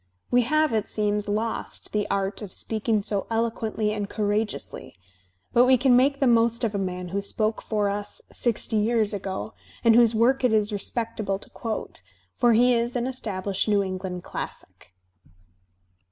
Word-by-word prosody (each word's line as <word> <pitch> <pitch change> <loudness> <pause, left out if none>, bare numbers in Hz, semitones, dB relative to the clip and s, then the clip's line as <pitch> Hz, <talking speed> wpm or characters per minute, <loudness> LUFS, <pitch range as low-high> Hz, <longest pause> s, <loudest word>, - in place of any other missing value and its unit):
We 245 - +5
have, 310 +3 +2
it 215 -2 0
seems, 210 -1 0
lost 220 +2 -3
the 210 -1 -1
art 195 +1 -1
of 205 -3 -7
speaking 215 0 -1
so 200 -2 -1
eloquently 225 -2 -1
and 205 -1 -3
courageously, 210 0 -3 0.6
but 240 +1 +6
we 260 0 +5
can 255 0 +4
make 275 +3 +3
the 275 - +2
most 235 0 +3
of 220 -2 0
a 200 - -1
man 180 -1 -4
who 200 +3 -2
spoke 215 +2 -1
for 210 -2 -1
us 205 +1 -2
sixty 230 -2 0
years 215 0 +1
ago 195 +2 -4 0.3
and 230 -1 +6
whose 230 -1 +5
work 255 +4 +3
it 250 -3 +3
is 210 0 +2
respectable 215 -1 -2
to - - -15
quote, 225 -2 -5 0.3
for 240 -2 +4
he 245 +3 +5
is 235 +1 0
an 245 -1 0
established 200 -7 -2
New 205 -1 +3
England 185 -1 -5
classic. - - -8
220 Hz, 170 wpm, -25 LUFS, 205-235 Hz, 0.6 s, but